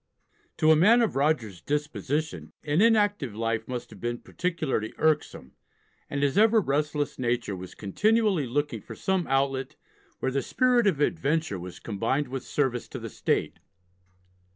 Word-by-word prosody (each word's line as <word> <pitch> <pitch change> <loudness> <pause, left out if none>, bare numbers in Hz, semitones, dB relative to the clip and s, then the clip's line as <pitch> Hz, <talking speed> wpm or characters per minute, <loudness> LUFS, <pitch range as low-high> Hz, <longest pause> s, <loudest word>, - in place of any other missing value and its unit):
To 155 - +5
a - - +7
man 220 +9 +5
of 220 - -1
Rogers's 135 - 0
disposition 150 +1 -3
an 150 +4 +1
inactive 205 - +3
life 115 0 -2
must 125 -2 -5
have - - -13
been 120 0 -2
particularly 155 -9 -3
irksome, 150 - 0 0.6
and 140 0 -1
his 140 +7 +2
ever 220 +1 +6
restless 145 -3 -1
nature 120 -4 -1
was 90 0 -9
continually 205 - +1
looking 130 -3 -2
for - - -10
some 190 -2 -1
outlet 135 0 0 0.4
where 130 - -1
the 135 +1 0
spirit 250 - +2
of 150 -7 +1
adventure 155 - 0
was 90 0 -8
combined 120 +6 -2
with 130 -1 -4
service 130 -4 -1
to - - -7
the - - -7
state. - - -1
145 Hz, 155 wpm, -27 LUFS, 120-170 Hz, 0.6 s, a